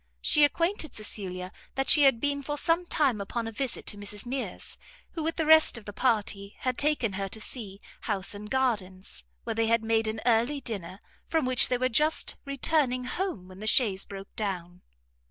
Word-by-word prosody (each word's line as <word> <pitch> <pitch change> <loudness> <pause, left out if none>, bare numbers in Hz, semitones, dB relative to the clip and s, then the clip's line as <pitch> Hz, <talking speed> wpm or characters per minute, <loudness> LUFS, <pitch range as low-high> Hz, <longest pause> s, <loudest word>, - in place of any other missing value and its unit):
She 300 - +3
acquainted 335 +2 +1
Cecilia 185 -4 -4 0.2
that 270 0 0
she 300 - +7
had 265 -4 +5
been 285 +2 0
for 295 +1 -3
some 340 +3 +2
time 265 -12 +1
upon 230 +3 -3
a - - -4
visit 240 +2 -3
to 205 - -5
Mrs 205 +2 -5
Mears, 260 +2 -4 0.4
who, 330 - -4
with 320 +1 -1
the 320 - 0
rest 315 -4 +6
of 220 - -11
the 205 - -7
party, 205 -4 0
had 255 -1 0
taken 285 -7 +2
her 195 0 -3
to 220 - -7
see 210 -4 -4 0.2
house 200 -3 -2
and 210 +1 -8
gardens, 195 - -1 0.2
where - - -2
they 225 0 +1
had 230 0 +3
made 225 0 +1
an 220 0 -2
early 240 +4 +3
dinner, 200 -6 -5 0.3
from 320 -4 +1
which 255 -1 +4
they 250 - +1
were 255 +1 +2
just 300 +6 +1
returning 275 -2 0
home 250 - -3
when 185 0 -12
the 215 - -5
chaise 205 -5 +3
broke 195 0 -10
down. 180 -5 -4
230 Hz, 195 wpm, -28 LUFS, 205-275 Hz, 0.4 s, she